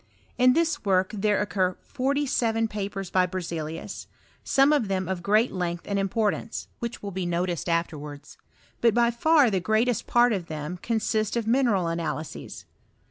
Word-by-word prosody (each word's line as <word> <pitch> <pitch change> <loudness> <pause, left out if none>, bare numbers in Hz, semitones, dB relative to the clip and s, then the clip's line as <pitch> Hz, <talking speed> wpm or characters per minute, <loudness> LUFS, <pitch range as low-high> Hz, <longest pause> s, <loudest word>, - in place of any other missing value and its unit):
In 250 0 +6
this 330 +2 +1
work 190 -2 +2
there 210 0 +1
occur 185 -3 0
foTty 280 +2 0
seven 225 -3 +1
papers 195 -3 -5
by 185 -1 +3
EerzcUus, 165 -3 -5 0.4
some 275 +2 +4
of 275 -8 +2
them 190 -2 -1
of 185 -2 -3
^jeat 215 +6 +3
length 175 -2 -3
and 200 -1 0
importance, 210 +3 -1
which 235 -2 -5
will 200 - -4
be 185 -1 -3
noticed 175 0 -1
afterwards; 150 -3 -3 0.5
but 230 -2 +4
by 235 0 +4
far 285 +1 +4
the 190 - +1
greatest 220 +6 +1
part 240 -1 +4
of 180 -4 -3
them 155 +3 -5
consist 220 -1 0
of 230 - -1
mi 235 +4 +3
neral 205 -9 +2
analyses. 160 -2 -5
200 Hz, 165 wpm, -26 LUFS, 180-235 Hz, 0.5 s, In